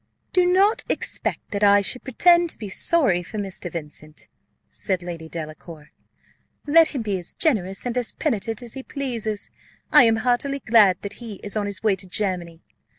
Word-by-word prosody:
"Do 360 -1 +4
not 400 +4 +4
expect - - -3
that 205 -1 -2
I 205 0 +6
should 250 +6 -2
pretend 345 +6 +4
to - - -4
be 210 -3 -7
sorry 200 - +2
for 180 +5 -8
Mr. 195 -3 -5
Vincent," 155 -1 -9 0.4
said 185 -3 -2
Lady 165 -2 -7
Delacour. 155 -1 -9 0.7
"Let 320 +2 +6
him 270 -7 -4
be 200 -3 -2
as 175 - -8
generous 195 - 0
and 245 -1 -2
as 245 -2 0
penitent 225 - -2
as 235 - -8
he 270 - -6
pleases, 235 -7 -4 0.4
I 250 - +8
am 225 -1 +4
heartily 255 +3 +1
glad 220 -7 +4
that 200 0 -5
he 225 -3 -7
is 205 - -4
on 210 -1 -1
his 200 0 -3
way 210 -3 +3
to 190 0 -8
Germany. 175 -3 -3
210 Hz, 180 wpm, -23 LUFS, 185-255 Hz, 0.7 s, I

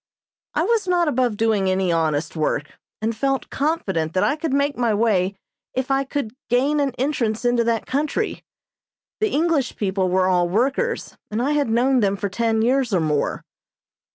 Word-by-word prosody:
I - - +2
was 450 -4 +1
not 350 -2 +2
above 245 -6 +1
doing 215 -4 +2
any 185 -1 +1
honest 160 -2 0
work, 150 -2 -2 0.2
and 225 +1 0
felt 270 +3 -1
confident 190 - -1
that 185 - +3
I 285 - +2
could 315 -1 -3
make 280 +1 +1
my 235 -3 +1
way 200 -3 +1 0.4
if 260 +1 -1
I 270 0 +2
could 270 -5 -3 0.2
gain 270 +5 +2
an 275 -3 0
entrance 245 -5 -1
into 240 -1 +3
that 230 -1 0
country. 285 +3 -2 0.8
The 430 - +1
English 310 -5 +1
people 190 -2 0
were 185 +1 +2
all 175 -2 +2
workers, 275 - -1
and 215 - -2
I 265 +4 +1
had 290 -5 +1
known 250 +3 +3
them 200 -3 +2
for 200 0 -2
ten 225 +2 0
years 255 0 +2
or - - +3
more. 155 -2 -1
235 Hz, 180 wpm, -22 LUFS, 195-280 Hz, 0.8 s, that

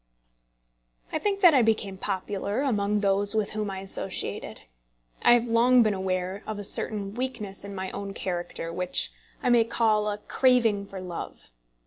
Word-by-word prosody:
I 315 - 0
think 400 +2 -1
that 350 -4 +8
I 265 - +5
became 220 -3 0
popular 200 +3 -3
among 210 -5 0
those 200 +1 +4
with 215 -2 0
whom 215 -1 -3
I 190 -1 -5
associated. 195 - -5 0.6
I - - +6
have 240 0 +2
long 240 +2 +5
been 215 -2 +1
aware 190 0 -2
of 215 - -4
a 205 - -5
certain 200 0 -1
weakness 235 -6 -4
in 200 0 -8
my 190 0 -4
own 200 0 -6
character, 175 -3 -4
which 180 +1 0 0.3
I 245 - +2
may 235 -1 +6
call 220 -2 +1
a 205 - -3
craving 225 -3 +2
for 195 - -8
love. 180 - -8
205 Hz, 165 wpm, -26 LUFS, 195-230 Hz, 0.6 s, that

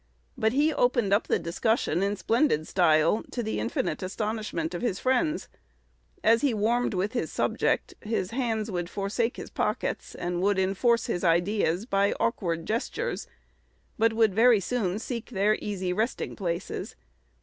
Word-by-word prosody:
But 220 +1 +1
he 300 +3 +3
opened 240 -7 +2
up 205 - +2
the - - +2
discussion 175 +1 0
in 200 +1 +1
splendid 225 - +1
style, 165 +2 +3
to 240 - -3
the 220 - -2
infinite 255 -1 -2
astonishment 200 -4 -3
of 175 - -4
his 220 -6 0
friends. 300 - 0 0.8
As 230 +1 +5
he 275 -6 +2
warmed 230 +1 +1
with 195 +5 -1
his 240 - -2
subject, - - 0
his 210 -3 -2
hands 225 -3 -1
would 175 -1 -3
forsake 215 +5 -1
his - - -8
pockets - - -2
and 175 0 -2
would 200 +1 +2
enforce 210 +5 +2
his 175 - -2
ideas 175 +2 +2
by 200 -3 +2
awkward 170 -7 -1
gestures, 240 - -2 0.7
but 225 0 +3
would 220 -3 +3
very 230 +1 +5
soon 195 -2 -1
seek 230 +1 -5
their 210 -1 +2
easy 190 -3 -2
resting 220 +6 -2
places. 175 -3 -4
210 Hz, 155 wpm, -27 LUFS, 185-235 Hz, 0.8 s, As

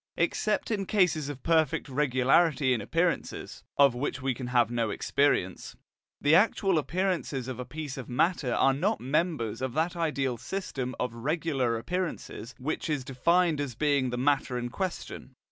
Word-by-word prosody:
Except - - 0
in 200 -3 -1
cases 165 -8 +2
of 135 -3 -7
perfect 160 -4 +2
regularity 135 +1 +3
in 115 - -1
appearances 165 - -2
(of 140 -3 +6
which 130 +4 -3
we 130 0 0
can 125 +1 -6
have 120 -2 +2
no 115 -2 0
experience), 100 -4 0 0.4
the 145 - +3
actual 195 -1 +4
appearances 170 -6 -1
of 130 -1 -5
a 125 - -4
piece 145 +1 -6
of 130 - -7
matter 135 +1 +1
are 135 +2 +3
not 135 - 0
members 135 - -1
of 130 -2 -2
that 165 +3 0
ideal 140 -7 -1
system 130 -3 -4
of 125 -2 -2
regular 135 -2 -1
appearances 125 - -4
which 145 +5 -3
is 145 -4 -1
defined 165 +4 +2
as 135 -5 -4
being 140 -1 +1
the 120 - -3
matter 135 -1 +1
in 120 0 -3
question. 175 -5 -5
140 Hz, 160 wpm, -28 LUFS, 125-165 Hz, 0.4 s, of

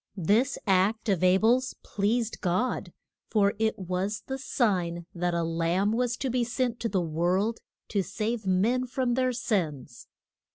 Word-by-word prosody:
This 215 - +2
act 205 +3 +2
of 185 -3 +1
A 185 +1 +6
bel's 245 +5 +2
pleased 225 +3 -1
God, 185 +8 -1 0.4
for 200 -2 +3
it 220 0 +1
was 185 +2 -3
the 265 0 -4
sign 180 - 0
that 175 0 -1
a 170 - +1
Lamb 165 +5 +1
was 240 +1 0
to 265 - -2
be 245 0 +1
sent 245 0 -1
to 230 - -1
the 195 - +1
world 180 +7 0 0.3
to 200 - +1
save 220 +2 -3
men 230 +8 +2
from 250 0 0
their 255 +1 +2
sins. 165 - -2
210 Hz, 160 wpm, -28 LUFS, 180-240 Hz, 0.4 s, A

